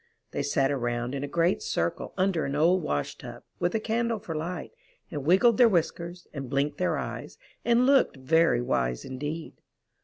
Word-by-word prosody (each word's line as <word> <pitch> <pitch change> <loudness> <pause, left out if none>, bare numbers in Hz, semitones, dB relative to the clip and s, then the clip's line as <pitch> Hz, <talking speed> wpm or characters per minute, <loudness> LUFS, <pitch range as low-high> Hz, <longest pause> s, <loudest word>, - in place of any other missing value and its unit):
They - - -2
sat 140 -1 +1
around 120 -2 -2
in 140 0 -3
a - - -2
great 170 +5 +1
circle 85 +1 -2
under 185 -3 +1
an 140 - -2
old 170 +5 +4
wash 75 - -2
tub, - - -9 0.2
with 175 +3 0
a - - +2
candle 230 +1 0
for 200 -5 -6
light, 160 +1 -4 0.4
and 145 -4 -4
wiggled 205 +6 +5
their 240 -2 +8
whiskers, 175 -1 -1
and 135 -4 -6
blinked 140 +2 0
their 180 - +1
eyes, - - -6 0.3
and 240 +1 +4
looked 270 - +4
very 145 -1 +3
wise 60 - -1
indeed. 145 +5 -6
160 Hz, 180 wpm, -27 LUFS, 135-185 Hz, 0.4 s, their